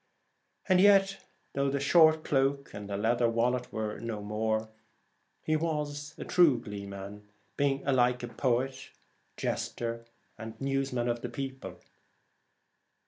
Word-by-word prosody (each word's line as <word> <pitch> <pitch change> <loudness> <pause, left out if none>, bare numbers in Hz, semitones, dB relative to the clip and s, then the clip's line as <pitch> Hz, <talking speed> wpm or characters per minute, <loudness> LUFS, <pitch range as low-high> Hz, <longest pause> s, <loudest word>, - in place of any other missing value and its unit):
And 185 -1 +5
yet 195 -1 +4 0.3
though 140 0 +1
the 140 +1 -1
short 155 +2 +5
cloak 140 0 0
and 105 0 -7
the 100 - -2
leather 115 +3 +2
wallet 125 +2 0
were 110 -1 -3
no 115 -2 -4
more, 110 +1 -1 0.8
he 155 - +1
was 150 -2 -3
a - - -6
true 160 -9 +4
gleeman, 100 -1 -8 0.3
being 140 -1 0
alike 125 -2 +1
poet, 130 +1 -1 0.5
jester, 115 0 -3 0.3
and 110 0 -8
newsman 135 -3 -1
of 120 0 -1
the 125 - -4
people. 135 +2 -6
125 Hz, 125 wpm, -30 LUFS, 115-140 Hz, 0.8 s, And